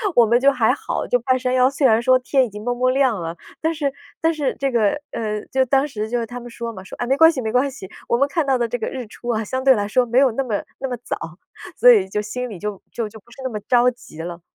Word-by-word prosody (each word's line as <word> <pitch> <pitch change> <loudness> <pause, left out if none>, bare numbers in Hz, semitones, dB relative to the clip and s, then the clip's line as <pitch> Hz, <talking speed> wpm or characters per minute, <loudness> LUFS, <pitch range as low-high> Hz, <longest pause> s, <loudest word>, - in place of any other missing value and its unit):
我 240 - +7
们 235 +2 +3
就 275 +2 +5
还 - - +2
好， - - -3
就 245 - +1
半 255 +2 +1
山 255 0 -1
腰 255 0 +4
虽 275 +1 0
然 225 -2 +5
说 255 +1 +5
天 260 +1 +2
已 245 - -2
经 210 +1 -9
蒙 245 +1 -1
蒙 255 +1 +2
亮 255 -7 +2
了， 165 +1 -5 0.2
但 320 - +1
是 285 -3 -1 0.3
但 325 0 +2
是 290 -4 -1
这 275 -1 0
个， 230 +3 +2
呃， 215 -2 -3
就 265 0 +3
当 270 +3 +2
时 215 -6 -4
就 240 +1 0
是 230 - -2
他 245 +2 -7
们 240 0 -10
说 235 0 -6
嘛， 190 -3 -9
说： - - -10
“哎， 245 - -2
没 265 +2 +2
关 325 +3 +7
系 305 - -5
没 220 -3 -2
关 250 +4 +2
系， 265 -8 -10 0.2
我 235 - +2
们 275 +3 +3
看 325 +3 0
到 265 -1 +3
的 240 -1 0
这 245 +2 -3
个 220 - -3
日 255 -2 -5
出 240 +3 -9
啊， 225 -2 0
相 260 +4 -3
对 265 -1 +6
来 205 -2 -1
说 245 +4 +2
没 240 +2 0
有 265 -1 +5
那 270 +5 -1
么 220 -6 -2 0.2
那 270 - -3
么 245 - -3
早。 165 +1 -5 0.4
“所 245 - +8
以 200 -5 +4
就 210 - -2
心 250 +4 -4
里 205 - -8
就 205 +2 -5
就 230 -2 -3
就 220 +1 -12
不 225 - -26
是 - - -16
那 260 - -1
么 215 -3 -4
着 245 +3 +3
急 235 -9 -15
了。 170 +1 -7
245 Hz, 325 characters per minute, -21 LUFS, 220-265 Hz, 0.4 s, 所